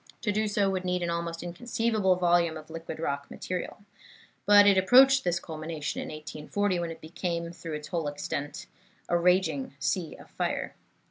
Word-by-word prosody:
To 210 - 0
do 215 +1 0
so 205 -1 +1
would 190 -1 -1
need 180 -1 -1
an 170 - -1
almost 170 0 -3
inconceivable 215 +1 0
volume 175 -2 +2
of 155 +1 -12
liquid 165 -1 -7
rock 140 -3 -3
material. 185 +2 -5 0.6
But 205 0 +8
it 200 -1 +6
approached 260 +8 +6
this 175 -1 +1
culmination 155 -1 -5
in - - -6
1840, 155 +5 -2
when 170 -1 -2
it 165 0 -8
became, 170 +1 -3
through 165 -2 -7
its 150 0 -6
whole 165 -4 -2
extent, 145 0 -4 0.4
a 175 - +1
raging 185 +10 +2
sea 175 -5 -1
of - - -15
fire. - - -2
175 Hz, 175 wpm, -28 LUFS, 160-200 Hz, 0.6 s, But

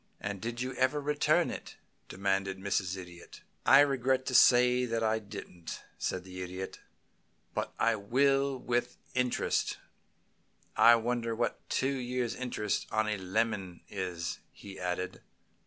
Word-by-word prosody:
"And 100 -1 -4
did 120 +1 -4
you 130 +1 -2
ever 130 +3 +2
return 145 +1 +2
it?" - - -8 0.3
demanded 95 0 -1
Mrs. 95 -1 -1
Idiot. 90 -2 -11 0.3
"I 135 +1 +9
regret 130 -2 +2
to 130 - -3
say 125 0 +6
that 115 -1 -1
I 110 0 +2
didn't," 100 -5 -8 0.2
said 90 - -2
the 95 0 -8
Idiot. 90 +1 -6 0.7
"But - - -3
I 115 0 +3
will, 135 +6 +2
and 130 - -11
with 120 0 0 0.2
interest. 125 -1 0 1.0
I 120 - +8
wonder 115 0 -1
what 115 -1 -2
two 135 +1 +1
years' 125 -2 -2
interest 115 -5 -2
on 110 0 +1
a 105 -1 0
lemon 95 -2 -1
is!" 90 -4 -4
he 100 -1 -11
added. 90 0 -3
115 Hz, 140 wpm, -31 LUFS, 95-125 Hz, 1.0 s, I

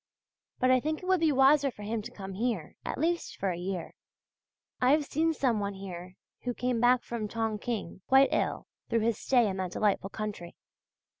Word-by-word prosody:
But 255 0 +3
I 255 - +5
think 310 +6 -3
it - - -6
would 370 -1 +3
be 320 -1 +3
wiser 275 +1 +5
for 210 -5 -10
him 220 +1 -2
to - - -8
come 195 -1 -8
here, 210 -5 -2
at - - -4
least 335 +4 -1
for 195 -1 0
a - - -3
year. 180 -1 -4 0.9
I 250 - +4
have 300 -1 +2
seen 320 +3 +1
some 255 -8 +1
one 200 -1 -3
here 185 -1 -8 0.2
who 245 -1 -3
came 250 -2 0
back 245 +1 +4
from 230 -3 -4
Tongking 220 -3 -3
quite 270 +1 +6
ill - - 0 0.2
through 230 -1 +2
his 230 -1 0
stay 245 -4 +3
in 195 -1 -2
that 185 -1 -3
delightful 200 -2 +1
country. 205 -5 -6
230 Hz, 200 wpm, -29 LUFS, 195-265 Hz, 0.9 s, quite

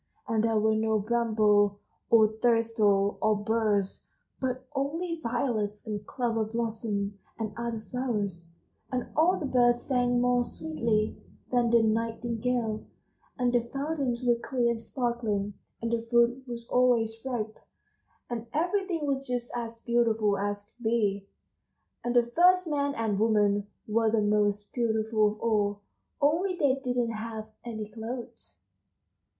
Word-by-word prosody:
And 220 -1 +1
there 225 -1 +2
were 220 +1 +3
no 220 0 +2
brambles 215 -2 +3 0.4
or 220 -2 +7
thistles 220 -3 +2
or 215 0 +3
burrs, 210 -2 0 0.4
but 255 -1 -2
only 325 +5 -2
violets 230 -5 -1
and 210 -2 -4
clover 230 -3 0
blossoms 220 -2 -2 0.2
and 220 -2 -3
other 235 -1 -3
flowers, 205 -9 -2 0.4
and 250 -1 -2
all 350 +4 +4
the 305 - -3
birds 240 -2 +3
sang 245 -2 +1
more 245 0 +3
sweetly 235 -8 -1 0.3
than 245 -2 +3
the 230 -1 +5
nightingale, 230 0 -1 0.5
and 245 -2 +1
the 240 - +4
fountains 275 -4 -2
were 240 -1 +4
clear 240 -2 +1
and 230 -1 -3
sparkling, 225 -5 -2 0.3
and 230 - -1
the 235 -1 +1
fruit 235 +3 +2
was 235 -1 -7
always 230 -3 +2
ripe, 225 -5 -3 0.7
and 235 -1 -5
everything 350 0 0
was 275 -1 -1
just 245 -1 -3
as 230 -1 -5
beautiful 225 -4 +2
as 205 +1 -2
could 235 +4 -20
be, 205 -3 +1 0.8
and 240 0 -1
the 240 - +6
first 365 +1 +5
man 285 -2 0
and 215 -3 -1
woman 205 -2 +2 0.2
were 225 +1 +2
the 225 0 +2
most 205 0 +1
beautiful 220 -2 +2
of 215 - -16
all, 205 -3 +1 0.4
only 335 +6 +2
they 280 -5 +3
didn't 245 -2 0
have 220 0 -6
any 220 -3 -5
clothes." 230 +3 -8
230 Hz, 140 wpm, -28 LUFS, 215-245 Hz, 0.8 s, or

